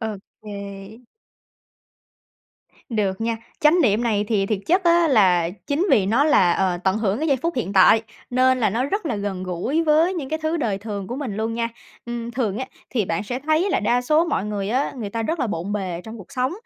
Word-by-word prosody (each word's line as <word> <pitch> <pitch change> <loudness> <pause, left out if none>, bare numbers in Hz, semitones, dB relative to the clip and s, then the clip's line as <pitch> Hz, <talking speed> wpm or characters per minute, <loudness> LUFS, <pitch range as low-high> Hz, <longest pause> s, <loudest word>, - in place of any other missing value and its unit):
OK. 205 +1 -8 1.8
Được 205 -4 -1
nha. 230 0 -1 0.2
Chánh 310 +4 +5
niệm 220 -3 +2
này 215 -3 +1
thì 200 -3 +1
thiệt 210 -1 -1
chất 365 +3 +2
á 340 -1 +4
là 185 - +4 0.2
chính 300 +7 0
vì 195 -4 +4
nó 235 +8 +3
là, 190 - +4
ờ, 185 -2 0
tận 190 +1 +2
hưởng 210 -1 0
cái 315 +2 -1
giây 275 - +3
phút 335 +7 -2
hiện 220 -5 -2
tại, 205 +3 +6 0.3
nên 255 +1 +3
là 220 - +2
nó 235 +6 0
rất 390 +6 -2
là 235 - -1
gần 200 -2 -4
gũi 185 - -1
với 320 +4 +3
những 290 -7 -4
cái 315 - -2
thứ 315 +2 0
đời 215 -9 -1
thường 200 -2 -5
của 245 - -5
mình 255 -8 -4
luôn 225 +1 -2
nha. 230 0 -1 0.4
Ừm, 235 0 -5
thường 225 -4 -2
á 260 - -3 0.2
thì 225 -5 0
bạn 165 +1 -2
sẽ 245 +4 -4
thấy 315 +7 +1
là - - +1
đa 240 +3 +2
số 305 +6 +3
mọi 330 - -1
người 205 -2 -3
á, 255 +6 0
người 215 -5 -5
ta 230 +2 -2
rất 320 +8 -2
là 250 - +1
bộn 200 -1 -3
bề 185 -4 -3
trong 225 +1 -9
cuộc 200 - -13
sống, 255 +1 0
230 Hz, 225 wpm, -22 LUFS, 200-280 Hz, 1.8 s, tại